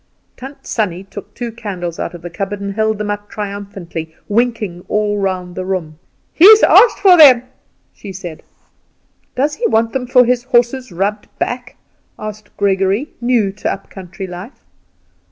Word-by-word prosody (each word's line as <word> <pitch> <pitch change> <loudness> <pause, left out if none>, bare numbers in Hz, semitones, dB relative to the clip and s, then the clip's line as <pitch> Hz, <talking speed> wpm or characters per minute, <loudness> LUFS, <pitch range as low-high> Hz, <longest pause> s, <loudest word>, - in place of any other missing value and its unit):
Tant 270 +2 -11
Sannie 185 -5 -2
took 195 0 -10
two 240 -1 -4
candles 185 -7 -6
out - - -4
of 170 - -12
the 175 - -6
cupboard 195 +3 -4
and 200 0 -4
held 220 0 0
them 210 0 -3
up 205 0 -6
triumphantly, 195 -6 -6
winking 215 -5 -1
all 210 -1 0
round 185 -2 -2
the 185 - -4
room. 175 -5 -4 0.3
"He's 425 +6 +8
asked 485 - +6
for 380 -3 +6
them," 260 -6 +8 0.5
she 200 - -10
said. 175 -4 -8 0.9
"Does 285 +4 0
he 470 - +1
want 225 +1 +1
them 255 -2 -2
for 250 0 +5
his 245 0 0
horse's 250 0 +1
rubbed 200 +4 -2
back?" 245 0 -4 0.4
asked 215 0 -8
Gregory, 195 +7 +1
new 240 -5 +1
to 205 - -3
up 195 - -8
country 190 0 -8
life. 180 +7 -10
205 Hz, 160 wpm, -17 LUFS, 190-240 Hz, 0.9 s, He's